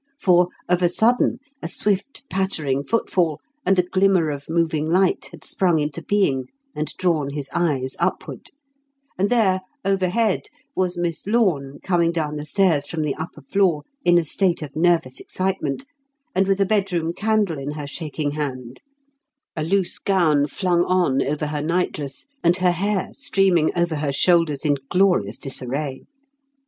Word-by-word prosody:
For, 180 -1 +4 0.2
of 180 0 +2
a 175 - +4
sudden, 235 +6 +2 0.2
a - - -3
swift 205 +10 -2
pattering 160 - -1
footfall 175 -6 0 0.3
and 195 - +4
a 180 - +4
glimmer 185 -3 +2
of 145 +1 -7
moving 160 -2 0
light 185 +2 +2
had - - -13
sprung 180 -4 +2
into 150 -1 -2
being 145 -11 +1 0.3
and 155 0 -2
drawn 165 -6 +1
his 140 -1 -5
eyes 140 -7 0
upward; - - -3 0.7
and 195 +2 +1
there, 205 -6 +3 0.3
overhead, 195 +2 +1 0.3
was 180 -1 0
Miss 175 +1 -3
Lorne 170 - +1
coming 170 -3 +2
down 155 -3 -2
the 150 - -5
stairs 160 -4 +2
from 160 -2 -2
the 150 -2 0
upper 160 -2 -8
floor 170 -1 +1 0.2
in 175 0 +5
a 175 - +3
state 170 +1 +1
of 145 -2 -9
nervous 165 -5 +2
excitement, 190 - -2 0.5
and 190 +1 +2
with 195 0 +1
a 195 - +4
bedroom 185 -5 0
candle 210 -6 0
in 140 +2 -4
her 150 -1 -6
shaking 150 0 -3
hand, 130 -4 -5 0.7
a 155 - -2
loose 190 +2 0
gown 160 -7 +2
flung 175 +3 +1
on 175 -8 +2
over 150 +2 -1
her 150 0 -3
nightdress, 155 -4 -2 0.2
and 170 +1 +4
her 180 -1 +3
hair 195 +2 -1
streaming 195 - +2
over 170 -2 +1
her 145 -1 -1
shoulders 160 0 +2
in 145 -1 +3
glorious 180 - +2
disarray. 135 +1 -2
170 Hz, 155 wpm, -22 LUFS, 150-190 Hz, 0.7 s, in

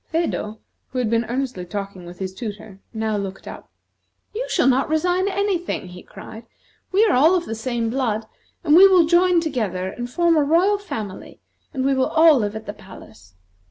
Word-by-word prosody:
Phedo, 320 -10 -2 0.3
who 260 - -8
had 240 -3 0
been 230 0 +1
earnestly 245 -5 -3
talking 195 -1 -7
with 175 0 -11
his 190 -1 -5
tutor, 210 -2 -8
now 220 -2 -2
looked 195 -1 -6
up. - - -10 0.6
"You - - -4
shall - - +1
not 265 +2 +2
resign 360 +5 +1
any 400 -2 0
thing!" 330 - -5
he 180 0 -11
cried. 225 +1 -12 0.4
"We 405 +4 +4
are 425 - +2
all 310 +8 +5
of 350 -1 -1
the 225 - -5
same 230 0 -2
blood, 230 -4 -1 0.4
and 305 -2 +4
we 380 +3 +9
will 365 -3 +5
join 350 +1 +3
together 210 - -2
and 240 +5 -6
form 340 +4 +2
a 300 - +4
royal 360 +8 +2
family, 215 - -7 0.3
and 265 -3 -3
we 275 - +2
will 260 -1 +1
all 315 -3 +5
live 210 -1 -2
at 220 0 -7
the 205 - -6
palace. 110 - -15
250 Hz, 195 wpm, -21 LUFS, 210-335 Hz, 0.6 s, we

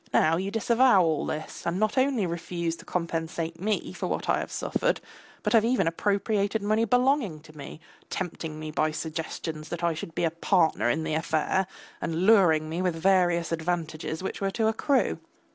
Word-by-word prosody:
Now 160 +1 +4
you 190 +2 -2
disavow 225 -1 +4
all 160 -3 0
this, 155 0 -5
and 170 +2 -1
not 215 0 +1
only 260 -5 +2
refuse 170 0 -3
to - - -14
compensate 165 -1 -3
me 210 +2 -1
for - - -4
what - - -3
I - - +2
have - - -5
suffered, - - 0 0.4
but - - 0
have 225 -2 +6
even 230 -5 +2
appropriated 200 +4 0
money 215 +2 +2
belonging 245 - +2
to 155 0 -16
me, 145 +1 -9 0.3
tempting 165 -4 -4
me 155 0 -5
by 155 0 +1
suggestions 160 0 -5
that 175 0 -5
I 170 -1 +2
should 160 +1 -7
be 170 - +2
partner 165 -4 +2
in 160 +5 0
the 155 -1 -2
affair, 160 +4 0 0.3
and 165 +2 -1
luring 175 -8 +5
me 165 +3 -3
with 180 -3 0
various 175 -1 +2
advantages 165 0 -3
which 190 - -4
were 195 - +1
to 220 +3 -1
accrue. 260 +5 +1
175 Hz, 180 wpm, -27 LUFS, 160-205 Hz, 0.4 s, have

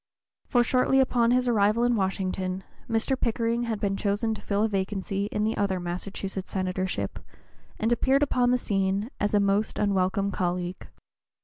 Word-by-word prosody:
For 245 -1 +3
shortly 255 +2 +3
after 245 -3 +3
his 250 0 +2
arrival 215 0 +3
in 240 0 +3
Washington, 190 -1 -2 0.3
Mr. 225 +4 +1
Pickering 235 -1 0
had 220 -3 -2
been 200 -1 0
chosen 205 +3 0
to 215 - -7
fill 205 +1 0
a - - +3
vacancy 195 0 -2
in 210 - -2
the 220 +1 0
other 190 -2 0
Massachusetts 190 +2 -5
senatorship, 185 - -2 0.6
and 225 +2 0
appeared 265 +4 +3
upon 250 -3 +2
the 250 - +4
scene 200 +1 -1
as 205 0 +1
a - - +5
most 200 +2 +1
unwelcome 200 0 +1
colleague. 180 -1 -3
205 Hz, 165 wpm, -27 LUFS, 190-230 Hz, 0.6 s, a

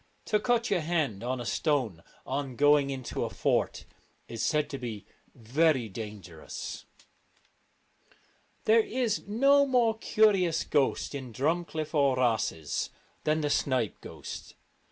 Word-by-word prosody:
To 210 - +2
cut 235 +1 +1
your 190 - +3
hand 155 - -1
on 125 +1 -2
a 120 - -5
stone 125 - 0 0.2
on 135 -1 -3
going 145 +1 +4
into 130 -3 -3
a - - -2
fort - - 0 0.4
is 115 - -5
said 150 -1 +1
to 140 - -4
be 115 -5 -6 0.3
very 130 +1 +1
dangerous. 100 -6 -7 1.8
There 225 +1 +6
is 235 -4 -1
no 275 +6 +4
more 240 -4 +3
curious 200 -6 +3
ghost 140 0 0
in 130 -3 -6
Drumcliff 155 +4 -1
or 140 -3 +3
Rosses 110 - 0 0.4
than 155 +1 +2
the 145 -1 0
snipe 130 -7 0
ghost. - - -9
145 Hz, 130 wpm, -29 LUFS, 120-180 Hz, 1.8 s, There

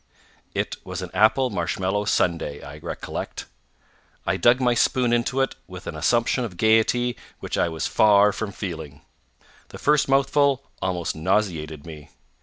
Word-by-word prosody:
It - - -2
was - - -5
an - - -7
apple 125 +4 +3
marshmallow 95 +2 -1
sundae, 85 -7 0
I 70 +2 -9
recollect. 85 - -6 0.8
I - - +1
dug 120 +2 +4
my 125 -2 +3
spoon 120 0 +2
into 120 +3 +1
it 135 - 0
with 90 -1 -10
an 80 - -5
assumption 115 - +1
of 100 -7 -6
gaiety 115 +3 +3 0.2
which - - -4
I - - +1
was 80 -1 -3
far 105 -1 +5
from 110 -3 -4
feeling. 80 -8 -7 0.7
The - - -9
first 150 -2 +2
mouthful 140 0 +3 0.2
almost 90 -2 -2
nauseated 80 -4 -1
me. 75 -2 -10
105 Hz, 150 wpm, -24 LUFS, 85-120 Hz, 0.8 s, far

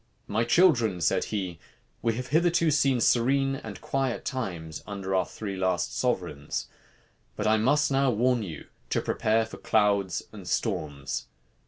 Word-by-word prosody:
"My 115 +3 0
children," 120 - +4
said 80 - +1
he, 95 -6 -4 0.4
"we 115 -1 +1
have 125 +2 -5
hitherto 170 +1 +3
seen 135 -4 +3
serene 135 +4 +3
and 110 -6 -8
quiet 135 -3 -1
times 85 -11 -4
under 100 -2 -4
our 95 -1 +2
three 100 -3 -5
last 95 -1 0
sovereigns: 70 0 -2 0.7
but 105 - -3
I 110 0 +4
must 145 +6 +2
now 135 0 +3
warn 125 +1 +2
you 85 -8 -7 0.2
to - - +1
prepare 110 +1 +1
for 110 - -10
clouds 100 -3 +1
and - - -10
storms. 70 -2 -2
110 Hz, 150 wpm, -27 LUFS, 95-135 Hz, 0.7 s, children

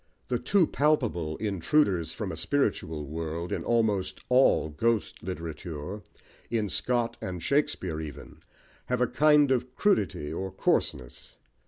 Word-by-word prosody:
The 125 -2 0
too 195 +3 +3
palpable 120 - +1
intruders 100 - +1
from - - -4
a - - -5
spiritual 80 - -1
world 80 +3 -4
in - - -2
almost 110 -5 +1
all 125 -10 +4
ghost 110 +8 0
literature, 85 +1 -6 0.5
in 110 -3 0
Scott 120 +4 0
and 90 -3 -5
Shakespeare 95 - 0
even, 75 -4 -9 0.5
have 125 -1 0
a - - +5
kind 145 +2 +4
of 130 0 0
crudity 95 - +1
or 95 +3 -3
coarseness. 60 -7 -1
100 Hz, 130 wpm, -28 LUFS, 80-125 Hz, 0.5 s, a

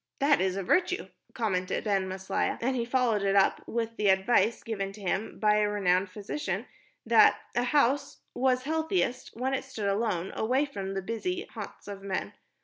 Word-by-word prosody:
"That 285 -3 +3
is 190 -1 +1
a 195 - -2
virtue," 370 - +1 0.3
commented 185 -6 -1
Ben 195 -3 0
Maslia, 190 0 -1
and 260 +3 0
he 235 -2 -1
followed 245 -4 +1
it 195 0 +1
up 195 -1 +4
with 230 -1 -3
the 210 - +1
advice 200 +4 +3
given 195 -4 -3
to 210 - -12
him 195 +3 -2
by 210 -1 +4
a 210 0 +2
renowned 190 -2 +1
physician 210 - -4 0.4
that - - +6 0.2
a 240 - +1
house 280 +1 +2 0.2
was 255 0 +1
healthiest 315 -3 -1
when 260 +3 -1
it 270 - -1
stood 210 -2 -4
alone, 195 -4 -1
away 255 +6 +1
from 195 -8 -5
the 195 - -2
busy 360 - -3
haunts - - -8
of 200 -1 -7
men. 195 -1 -3
220 Hz, 180 wpm, -29 LUFS, 195-255 Hz, 0.4 s, that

